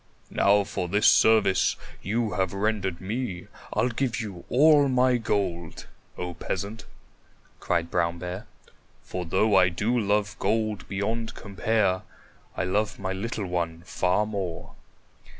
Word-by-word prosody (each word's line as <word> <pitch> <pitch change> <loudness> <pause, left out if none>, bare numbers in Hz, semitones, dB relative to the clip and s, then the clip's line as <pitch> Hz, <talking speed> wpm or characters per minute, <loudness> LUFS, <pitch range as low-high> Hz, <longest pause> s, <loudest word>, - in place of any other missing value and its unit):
"Now 100 +1 +4
for 95 -2 -3
this 105 +4 +1
service 110 -4 +5 0.3
you 110 +2 -1
have 95 -2 -1
rendered 100 -3 -1
me, 100 -2 -3 0.3
I'll 125 - +1
give 120 -1 -1
you 100 -6 -6
all 145 +1 +5
my 125 -1 +3
gold, 95 -7 -2 0.3
O 90 0 -4
Peasant," 100 +6 -4 0.7
cried 85 -1 -1
Brown 85 0 +1
Bear. 90 +3 -6 0.6
"For 90 -1 -5
though 100 +5 +2
I 90 -1 +6
do 105 +7 -1
love 105 0 0
gold 110 -2 -1
beyond 110 +3 -2
compare, 100 -1 0 0.6
I - - 0
love 100 +2 0
my 95 -1 -3
little 105 +1 -3
one 85 -2 -3
far 90 +3 +1
more." 95 -5 -5
100 Hz, 135 wpm, -26 LUFS, 90-110 Hz, 0.7 s, I